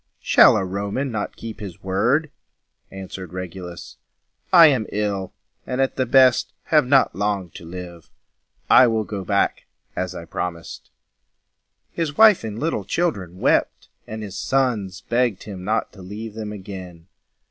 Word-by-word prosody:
"Shall - - +6
a 95 - -1
Roman 100 +8 -3
not 105 -2 -4
keep 115 -1 -8
his 95 -6 -9
word?" 125 +11 +1 0.6
answered 95 -2 -8
Regulus. 90 -1 -8 0.5
"I 170 -3 +9
am 130 -8 +3
ill, 100 -3 -2 0.4
and 125 - -3
at 135 0 +1
the 130 -2 -1
best 130 0 +4
have 150 -5 +3
not 135 -8 +4
long 100 -3 -2
to 85 - -11
live. 85 -1 -9 0.6
I 130 - +7
will 110 -1 0
go 100 -2 -5
back, 100 +1 0 0.3
as 90 0 -3
I 85 - -7
promised." 85 0 -6 1.0
His 160 -4 -3
wife 215 - +7
and 110 -1 -5
little 150 -6 -2
children 100 - -2
wept, - - +1 0.2
and 110 0 -6
his 100 -2 -8
sons 110 -9 -1
begged 120 -4 0
him 95 -3 -8
not 110 +4 -1
to 95 - -13
leave 105 +4 -7
them 110 -1 -6
again. 95 -4 -9
105 Hz, 150 wpm, -22 LUFS, 95-125 Hz, 1.0 s, I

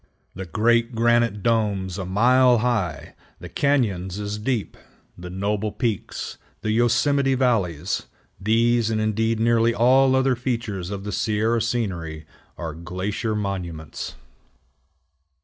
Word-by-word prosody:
The 95 0 -7
great 115 +6 +2
granite 120 -2 +2
domes 105 -5 0
a 95 - -3
mile 125 +5 +4
high, 95 - -1 0.3
the - - -8
cañons 100 -10 0
as 105 +1 -4
deep, 115 -2 -2 0.4
the 90 0 -9
noble 100 +3 -2
peaks, 115 -5 -3 0.2
the 110 - -1
Yosemite 130 +4 +2
valleys, 100 - 0 0.3
these, 115 +2 +2
and 110 -1 0
indeed 110 +1 0
nearly 115 0 +3
all 130 +3 +4
other 130 -1 +3
features 115 -7 -3
of 100 -1 -5
the 105 - -4
Sierra 110 +3 +1
scenery, 85 -10 -3 0.3
are 80 -2 -5
glacier 95 +7 -3
monuments. 90 -7 -4
110 Hz, 120 wpm, -23 LUFS, 95-120 Hz, 0.4 s, mile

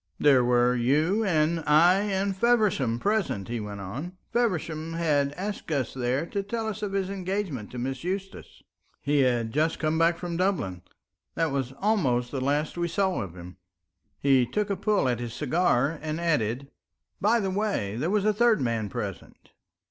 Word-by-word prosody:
"There 135 -4 +5
were 120 0 +3
you 150 - +2
and 165 -3 +2
I 170 +5 +6
and 200 -1 -1
Feversham 200 - +2
present," 195 - -1
he 120 0 -2
went 105 -1 -6
on. 140 - -6 0.2
"Feversham 165 -8 -1
had 150 -4 +1
asked 195 +1 -5
us 135 -5 -1
there 130 +3 -1
to 200 +3 -3
tell 220 +3 -3
us 215 -2 -4
of 205 -2 -3
his 195 -1 -1
engagement 185 - -3
to 125 - -9
Miss 130 +3 -3
Eustace. 195 +2 -5 0.4
He 145 0 +1
had 120 -4 +2
just 155 +4 +1
come 155 0 0
back 165 +1 +3
from 175 -1 -4
Dublin. 175 - -1 0.5
That 165 -3 0
was 135 -2 -2
almost 135 - +1
the 135 - -3
last 145 +5 -1
we 170 - +1
saw 190 +1 0
of 90 -3 -7
him." 90 +1 -10 0.6
He 135 -2 +4
took 205 - -1
a - - +1
pull 200 -5 +1
at 120 -2 0
his 120 -2 -5
cigar 150 -1 +1
and 155 +1 -3
added, 140 -5 -1 0.5
"By 225 +4 +3
the 195 -3 -1
way, 195 - -1
there 150 +9 -1
was 205 0 +1
a 215 - +3
third 235 +1 +3
man 115 -4 -1
present." - - -7
160 Hz, 180 wpm, -27 LUFS, 125-195 Hz, 0.6 s, I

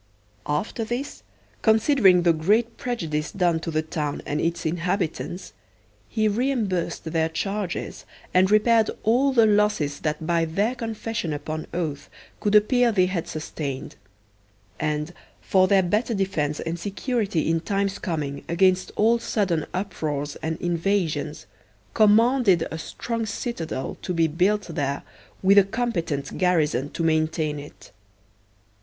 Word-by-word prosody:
After 150 +10 -1
this, 240 +5 -4 0.4
considering 220 - +4
the 170 -1 +5
great 215 +9 +1
prejudice 165 -11 -3
done 175 -4 +1
to 165 - -5
the 155 -1 0
town 150 -2 -3
and 150 +1 -1
its 170 0 -1
inhabitants, 175 +1 -2 0.6
he 215 -1 +1
reimbursed 215 -5 -1
their 160 0 0
charges 195 +2 -3 0.3
and 185 +1 +4
repaired 220 +1 +4
all 250 +5 +3
the 235 -4 +5
losses 205 -9 +2
that 155 +1 -2
by 170 0 +2
their 200 +9 0
confession 225 - -3
upon 155 +2 -5
oath 155 -5 -3 0.3
could 210 0 +1
appear 240 +3 +4
they 185 -4 +3
had 180 -3 -2
sustained; 145 -3 -5 0.8
and, 150 +2 -2 0.3
for 185 -1 +3
their 195 0 +4
better 215 +6 0
defence 160 -7 -1
and 165 +1 -3
security 205 - -1
in 165 0 +2
times 195 +2 -1
coming 150 -6 -3
against 185 +2 +2
all 230 +3 +3
sudden 195 -8 -1
uproars 155 -7 -3
and 160 0 -4
invasions, 165 -4 -1 0.5
commanded 215 -4 +4
a 160 - -5
strong 230 +7 -4
citadel 170 - -4
to 180 - -3
be 165 -1 +3
built 185 +7 +1
there 140 -5 -3 0.4
with 200 +2 +7
a - - +6
competent 185 - -3
garrison 155 -7 +2
to 165 - -4
maintain 155 -1 0
it. 145 - -13
180 Hz, 135 wpm, -24 LUFS, 160-210 Hz, 0.8 s, with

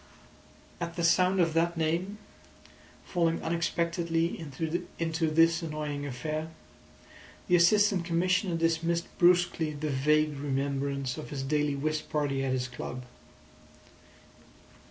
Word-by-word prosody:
At 170 -1 -4
the 170 - -2
sound 180 +3 +3
of 165 -2 +2
that 170 +1 +1
name, 170 +6 -1 0.9
falling 165 -2 0
unexpectedly 170 0 0 0.6
into 165 0 0
this 165 +2 +4
annoying 150 -3 -4
affair, 155 +5 -4 1.0
the 180 - +4
Assistant 195 +1 +4
Commissioner 180 +2 +1
dismissed 165 +1 0
brusquely 175 -3 +3
the 150 +1 -3
vague 150 +2 +2
remembrance 140 -1 -2
of 155 - -8
his 140 -3 -4
daily 150 +1 0
whist 155 +2 -2
party 140 -3 -1
at 135 - -1
his 130 -1 -1
club. 125 0 -7
160 Hz, 115 wpm, -29 LUFS, 145-170 Hz, 1.0 s, this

